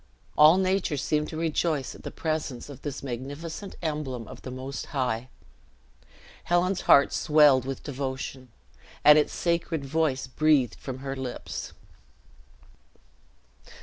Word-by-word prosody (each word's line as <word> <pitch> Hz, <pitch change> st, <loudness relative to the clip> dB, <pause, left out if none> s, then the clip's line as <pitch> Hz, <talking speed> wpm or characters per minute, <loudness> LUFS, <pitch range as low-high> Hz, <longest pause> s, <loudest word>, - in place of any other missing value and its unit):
All 155 Hz, +4 st, +7 dB
nature 190 Hz, -5 st, +1 dB
seemed 150 Hz, +2 st, 0 dB
to 155 Hz, -, -6 dB
rejoice 160 Hz, -3 st, 0 dB
at -, -, -13 dB
the -, -, -6 dB
presence 155 Hz, -5 st, -3 dB
of 140 Hz, -, -10 dB
this 145 Hz, -2 st, -5 dB
magnificent 145 Hz, -, -6 dB
emblem 140 Hz, -8 st, -3 dB
of -, -, -11 dB
the -, -, -7 dB
Most 130 Hz, +2 st, -6 dB
High. 125 Hz, -3 st, -2 dB, 1.2 s
Helen's 175 Hz, +2 st, +1 dB
heart 140 Hz, -, +7 dB
swelled 150 Hz, -4 st, +5 dB
with 135 Hz, -1 st, -5 dB
devotion, 130 Hz, -2 st, -5 dB, 0.5 s
and 150 Hz, +1 st, +8 dB
its 150 Hz, -, 0 dB
sacred 170 Hz, -3 st, -1 dB
voice 140 Hz, -2 st, 0 dB
breathed 135 Hz, -3 st, +2 dB
from 130 Hz, -2 st, -6 dB
her 135 Hz, 0 st, -3 dB
lips. 130 Hz, -2 st, -6 dB
145 Hz, 125 wpm, -27 LUFS, 130-160 Hz, 1.2 s, and